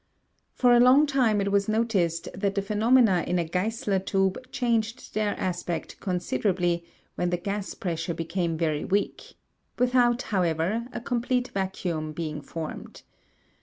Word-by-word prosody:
For 245 -1 +4
a 240 - +6
long 255 +5 +7
time 250 -8 +2
it 200 0 -1
was 200 +1 +2
noticed 190 -7 0
that 195 +1 -1
the 200 - +1
phenomena 215 -2 +3
in 180 - +1
a 170 - 0
Geissler 195 +3 -1
tube 195 +6 -1
changed 235 0 -1
their 210 -1 -1
aspect 175 -2 -3
considerably, 180 -1 0 0.3
when 175 - -1
the 175 - 0
gas 200 +2 -4
pressure 165 -2 -3
became 165 0 -2
very 155 -2 0
weak, 200 +2 -2 0.4
without, 245 0 +3
however, 185 +4 0
a - - -5
complete 245 +1 -1
vacuum 175 -5 -2
being 155 -2 -4
formed. 160 +2 -7
195 Hz, 140 wpm, -26 LUFS, 175-230 Hz, 0.4 s, long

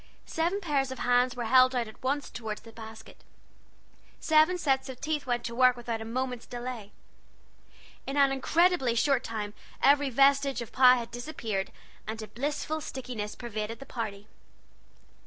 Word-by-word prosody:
Seven 345 +5 -1
pairs 285 -6 0
of 260 - -6
hands 245 0 +2
were 240 -1 -3
held 255 +2 +5
out 240 -2 0
at 220 - -14
once 280 +3 -2
toward 220 -3 -5
the 225 - -13
basket; 220 0 -12 1.0
seven 315 +3 +4
sets 270 -4 0
of 255 -2 -8
teeth 300 -2 -2
went 240 -1 0
to 235 - -4
work 250 0 +4
without 235 -2 -4
a - - -5
moment's 250 +1 -3
delay. 240 -4 -6 1.2
In 275 +1 -3
an 275 -1 +5
incredibly 270 -2 +2
short 260 +1 +2
time 210 -2 -4 0.3
every 285 0 +4
vestige 275 +1 +3
of 235 - -6
the - - -18
pie 255 -1 +8
had 235 -1 -5
disappeared, 230 -6 -4 0.4
and 220 +1 -4
a - - -7
blissful 295 +7 -3
stickiness 245 -7 -5
pervaded 225 -1 -5
the 275 - -11
party. 210 -5 -5
250 Hz, 165 wpm, -29 LUFS, 230-275 Hz, 1.2 s, pie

